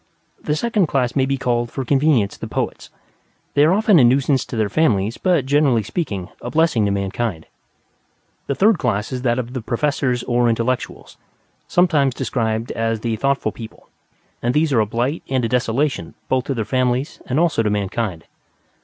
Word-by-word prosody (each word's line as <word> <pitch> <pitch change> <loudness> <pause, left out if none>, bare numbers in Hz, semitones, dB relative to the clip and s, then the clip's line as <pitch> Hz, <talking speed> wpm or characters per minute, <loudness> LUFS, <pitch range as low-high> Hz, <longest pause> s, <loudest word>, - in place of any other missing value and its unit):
The 150 - -1
second 210 0 +1
class 125 -4 0
may 135 -1 +2
be 135 0 0
called 120 -2 -1
for 135 +2 -5
convenience 135 -6 +2
the - - -7
Poets; - - -4 0.6
they 145 - +4
are 155 - +5
often 205 -2 +4
a - - +6
nuisance 130 +2 +3
to - - -7
their 110 -2 +1
families, 105 -4 +1
but, 175 -8 +2
generally 135 -5 +2
speaking, 100 - -4
a 120 - -5
blessing 155 -8 +2
to 100 - +1
mankind. 100 -2 -2 1.0
The 140 - -1
third 205 0 +3
class 110 -2 -1
is 130 -1 -3
that 120 -1 +1
of 125 -1 -4
the 130 - -3
Professors 125 +1 -1
or 120 0 +2
Intellectuals; 115 +2 -2 0.5
sometimes 150 -8 +2
described 110 -2 -2
as 115 -1 -1
the 115 -1 -1
thoughtful 140 +5 0
people; 115 -2 -11 0.5
and 120 +1 0
these 150 -1 +2
are 115 - +4
a 105 - +2
blight 125 +9 -1
and 130 -3 +1
a - - +1
desolation 125 +3 -1
both 130 0 +1
to 135 - -2
their 110 -3 -2
families 130 +4 -1
and 130 +3 0
also 165 -8 +2
to 105 - 0
mankind. 100 -4 -2
125 Hz, 180 wpm, -20 LUFS, 115-145 Hz, 1.0 s, a